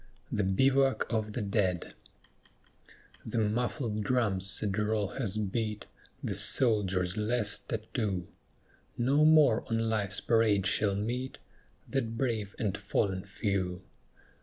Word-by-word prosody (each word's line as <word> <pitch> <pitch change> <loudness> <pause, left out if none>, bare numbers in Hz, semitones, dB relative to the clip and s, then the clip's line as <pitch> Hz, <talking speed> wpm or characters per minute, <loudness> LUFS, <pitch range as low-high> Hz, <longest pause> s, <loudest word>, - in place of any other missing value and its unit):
THE 105 - 0
BIVOUAC 135 +8 +2
OF 110 -2 -1
THE 120 - -2
DEAD 95 -3 -1 1.3
The - - -4
muffled 110 0 -1
drum's 100 -5 0
sad 95 +2 -1
roll 105 -2 0
has 110 -4 -2
beat 105 +1 -2 0.4
The - - -2
soldier's 100 -6 +2
last 105 0 0
tattoo; 110 -5 -3 0.7
No 135 +5 +3
more 155 -7 +5
on 115 - +1
Life's 100 -3 +2
parade 110 -4 +2
shall 100 +1 +2
meet 120 +6 -3 0.5
That 115 -4 -2
brave 110 -6 -2
and 105 -5 -1
fallen 95 -2 -1
few. 95 -2 -2
105 Hz, 115 wpm, -30 LUFS, 100-120 Hz, 1.3 s, more